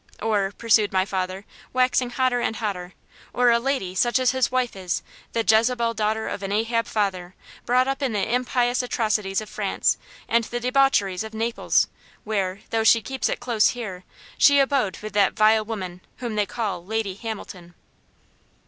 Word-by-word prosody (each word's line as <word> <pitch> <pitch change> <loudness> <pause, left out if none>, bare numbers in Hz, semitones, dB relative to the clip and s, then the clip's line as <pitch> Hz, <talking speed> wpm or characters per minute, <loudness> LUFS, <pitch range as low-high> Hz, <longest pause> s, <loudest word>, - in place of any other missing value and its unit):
"Or," 205 -3 0
pursued 220 -2 +3
my 185 0 +2
father, 190 0 -3 0.3
waxing 255 0 +2
hotter 250 -1 +1
and 225 - -1
hotter, 190 -5 -4 0.4
"or 245 -1 +4
a 235 - +4
'lady' 245 -8 -2
such 240 +6 +2
as 255 -1 +3
his 260 -1 +1
wife 255 -3 0
is, 185 -3 -3 0.3
the 230 -1 0
Jezebel 230 +1 +3
daughter 220 0 -1
of - - -4
an 195 0 -4
Ahab 230 +2 0
father! 190 -4 -2 0.3
brought 255 +1 +3
up 270 +1 -2
in 270 -3 0
the 210 +2 -1
impious 245 0 +1
atrocities 215 -5 -1
of 215 - -8
France, - - 0 0.3
and 235 0 +2
the 240 - -4
debaucheries 245 -7 +2
of 220 0 -8
Naples, 230 +2 +1 0.4
where, 200 -3 -2
though 225 -1 +1
she 225 0 +5
keeps 265 +2 -2
it - - -2
close 235 -3 +2
here, 190 -6 -6 0.4
she 285 -1 +6
abode 265 -8 +1
with 215 -2 -6
that 200 -2 +3
vile 215 0 +4
woman 185 -5 -6 0.2
whom 240 -3 -4
they 210 -1 0
call 205 -7 -3
Lady 215 0 -2
Hamilton." 190 -5 -8
220 Hz, 175 wpm, -24 LUFS, 195-245 Hz, 0.4 s, she